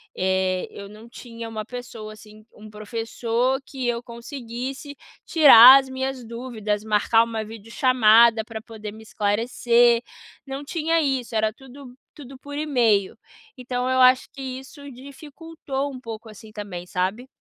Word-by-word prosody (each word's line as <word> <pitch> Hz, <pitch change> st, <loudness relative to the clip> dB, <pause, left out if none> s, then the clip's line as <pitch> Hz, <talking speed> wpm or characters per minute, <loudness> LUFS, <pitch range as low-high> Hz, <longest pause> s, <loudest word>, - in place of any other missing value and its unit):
eh, 185 Hz, 0 st, -1 dB
eu 200 Hz, 0 st, -10 dB
não 215 Hz, +2 st, -14 dB
tinha 230 Hz, -1 st, -10 dB
uma 215 Hz, -1 st, -6 dB
pessoa, 235 Hz, -3 st, -9 dB
assim, 215 Hz, 0 st, -16 dB
um 215 Hz, 0 st, -13 dB
professor 230 Hz, +4 st, -2 dB
que 260 Hz, -3 st, -5 dB
eu 235 Hz, 0 st, -2 dB
conseguisse 255 Hz, +3 st, -8 dB, 0.3 s
tirar 270 Hz, -5 st, +9 dB
as 265 Hz, -1 st, -7 dB
minhas 260 Hz, -1 st, -4 dB
dúvidas, 220 Hz, -3 st, -4 dB
marcar 220 Hz, +1 st, +3 dB
uma 225 Hz, -1 st, -4 dB
vídeo 225 Hz, +1 st, -12 dB
chamada 235 Hz, -3 st, +4 dB
pra 220 Hz, -1 st, -8 dB
poder 215 Hz, -2 st, -9 dB
me 220 Hz, +1 st, -13 dB
esclarecer, 235 Hz, +3 st, +2 dB, 0.4 s
não 275 Hz, +1 st, -6 dB
tinha 330 Hz, +1 st, 0 dB
isso, 260 Hz, -5 st, -2 dB
era 215 Hz, 0 st, +1 dB
tudo 265 Hz, 0 st, -14 dB, 0.2 s
tudo 270 Hz, -2 st, -12 dB
por 285 Hz, +1 st, -8 dB
email. 235 Hz, -10 st, +1 dB, 0.4 s
Então 250 Hz, 0 st, -3 dB
eu 260 Hz, 0 st, +1 dB
acho 255 Hz, 0 st, +4 dB
que 275 Hz, -, -11 dB
isso 265 Hz, +2 st, -8 dB
dificultou 280 Hz, +1 st, -7 dB
um 255 Hz, -, -9 dB
pouco 225 Hz, -2 st, -9 dB
assim 215 Hz, +1 st, -13 dB
também, 200 Hz, -5 st, -7 dB
sabe? 195 Hz, +9 st, -3 dB
235 Hz, 150 wpm, -23 LUFS, 220-265 Hz, 0.4 s, tirar